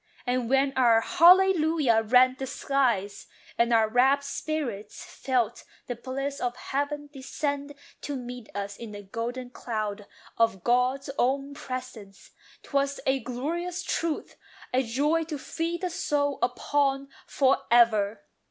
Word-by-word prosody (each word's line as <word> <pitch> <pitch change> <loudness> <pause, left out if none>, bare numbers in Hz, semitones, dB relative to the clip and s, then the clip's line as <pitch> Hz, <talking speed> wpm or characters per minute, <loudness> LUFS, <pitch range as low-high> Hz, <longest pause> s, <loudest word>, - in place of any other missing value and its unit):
And 250 -2 -1
when 270 +1 +2
our 235 -3 +5
"Hallelujah" 325 -8 +5
rent 255 +4 +4
the 265 - -3
skies, 245 -8 -1 0.3
And 235 0 +2
our 225 -1 +4
rapt 265 +5 +3
spirits 280 - -4
felt 255 -9 -1 0.2
the 245 - -4
bliss 275 +3 -4
of 245 -1 -2
heaven 290 +2 -3
Descend 285 +1 -4 0.3
to 290 - -4
meet 245 -2 -7
us 200 0 -4
in 225 -3 -8
the 205 0 -8
golden 240 +5 -5
cloud 215 -4 -4 0.3
Of 225 -5 +2
God's 250 +3 +1
own 275 +3 +1
presence, 255 -8 -8 0.3
'twas 280 0 -1
a 265 0 +2
glorious 335 - -4
truth, 330 -3 -3 0.4
A 255 - +3
joy 290 +7 +1
to 310 -2 -5
feed 335 +5 -3
the 365 -1 -2
soul 285 -3 -1
upon 275 +2 0 0.2
for 270 -1 +2
ever! 215 -3 +3
260 Hz, 135 wpm, -27 LUFS, 235-285 Hz, 0.4 s, our